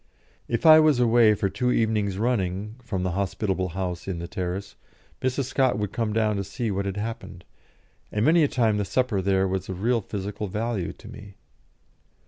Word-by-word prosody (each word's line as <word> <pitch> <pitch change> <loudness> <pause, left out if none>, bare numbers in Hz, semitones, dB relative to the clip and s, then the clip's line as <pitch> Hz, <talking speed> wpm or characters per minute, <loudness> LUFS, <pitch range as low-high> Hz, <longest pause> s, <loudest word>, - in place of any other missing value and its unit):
If 120 +7 -2
I 155 0 +10
was 155 -5 +4
away 115 -2 +5
for 100 -1 0
two 110 +6 -1
evenings 105 -5 0
running 105 -3 -1
from 95 -6 -3
the 90 - -1
hospitable 95 0 -1
house 90 -2 -3
in 95 -3 -3
the 85 0 -5
terrace, 95 0 -4 0.5
Mrs. 130 +2 0
Scott 130 0 +1
would 105 -2 -2
come 115 -2 -1
down 105 -1 +1
to 100 - -1
see 105 +3 -3
what 100 0 -2
had 100 0 -4
happened, 110 +2 -6 0.7
and 105 +1 0
many 165 +3 +5
a - - +4
time 115 -6 +1
the 105 - 0
supper 120 -3 0
there 95 0 +2
was 95 0 -3
of 95 +1 -5
real 120 0 +2
physical 100 +1 -5
value 105 -1 -2
to - - -15
me. 105 -2 -11
105 Hz, 190 wpm, -25 LUFS, 95-115 Hz, 0.7 s, I